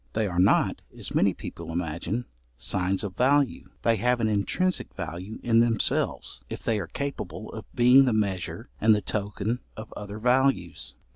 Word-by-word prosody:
They 110 -1 +1
are 90 -2 -2
not, 95 - +3 0.2
as - - -4
many - - +4
people 85 -1 -7
imagine, 85 +7 -2 0.3
signs 95 - 0
of 95 -2 -5
value; 135 +2 +2
they 115 -1 +3
have 125 +4 +2
an 115 - +2
intrinsic 175 - 0
value 95 +6 -6
in 115 -1 +4
themselves, 115 - +1
if - - -6
they 110 -2 +1
are - - -4
capable 140 -5 -5
of 110 -2 -8
being 125 +3 +7
the 125 - +2
measure 100 -5 -1 0.2
and 110 0 +6
the 105 - -1
token 105 +3 -2 0.2
of 110 +1 -8
other 105 0 -6
values. 125 -6 +1
110 Hz, 165 wpm, -27 LUFS, 95-120 Hz, 0.3 s, being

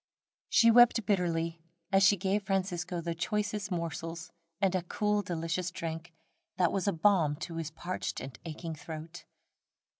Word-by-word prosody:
She 230 0 +6
wept 235 -2 +6
bitterly 170 -4 0 0.3
as 195 0 +5
she 200 +1 +6
gave 195 +3 0
Francisco 185 -3 -1
the 170 0 -2
choicest 205 +3 -2
morsels, 165 0 -4 0.3
and 195 -2 +2
a 185 - +1
cool, 210 +4 0
delicious 170 0 -2
drink, 165 -1 -5 0.5
that 180 -2 +3
was 195 +1 -1
a - - +4
balm 165 -3 +3
to 165 -2 -5
his 160 -2 -3
parched 175 +3 -4
and 130 -2 -7
aching 165 0 -6
throat. 160 +2 -8
175 Hz, 150 wpm, -31 LUFS, 165-195 Hz, 0.5 s, She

